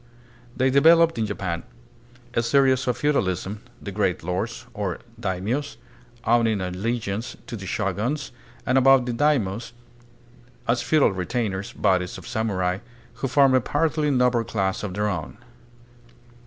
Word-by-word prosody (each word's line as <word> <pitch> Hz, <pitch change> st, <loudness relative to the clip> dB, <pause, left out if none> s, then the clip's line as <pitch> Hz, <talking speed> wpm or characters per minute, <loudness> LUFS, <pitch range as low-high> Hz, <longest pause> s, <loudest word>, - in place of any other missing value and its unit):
They 130 Hz, +1 st, +3 dB
developed 165 Hz, +2 st, +5 dB
in 110 Hz, -, 0 dB
Japan 95 Hz, -4 st, -3 dB, 0.7 s
a -, -, +2 dB
species 130 Hz, +2 st, +3 dB
of 125 Hz, -, +1 dB
feudalism, 105 Hz, -, 0 dB, 0.2 s
the 100 Hz, -, -7 dB
great 95 Hz, -4 st, 0 dB
lords, 105 Hz, +8 st, -3 dB
or 100 Hz, -5 st, -3 dB, 0.2 s
"daimios," 110 Hz, +8 st, -2 dB, 0.5 s
owning 115 Hz, -2 st, +3 dB
allegiance 100 Hz, +4 st, -3 dB
to -, -, -6 dB
the 95 Hz, -3 st, -7 dB
shoguns, 105 Hz, -, -2 dB, 0.3 s
and 130 Hz, +1 st, +4 dB
about 135 Hz, -1 st, +5 dB
the 125 Hz, -, -2 dB
daimios, 115 Hz, -5 st, 0 dB, 0.9 s
as 120 Hz, +1 st, +2 dB
feudal 155 Hz, -7 st, +3 dB
retainers, 100 Hz, +2 st, -2 dB
bodies 90 Hz, -1 st, +1 dB
of -, -, -11 dB
samurai, 95 Hz, -4 st, -1 dB, 0.4 s
who 135 Hz, -, +1 dB
formed 135 Hz, +1 st, +4 dB
a 130 Hz, -, +4 dB
partly 150 Hz, +2 st, 0 dB
noble 125 Hz, -3 st, +3 dB
class 95 Hz, -2 st, -1 dB
of 95 Hz, -4 st, -5 dB
their 105 Hz, +1 st, 0 dB
own. 95 Hz, -2 st, -4 dB
115 Hz, 135 wpm, -24 LUFS, 95-130 Hz, 0.9 s, developed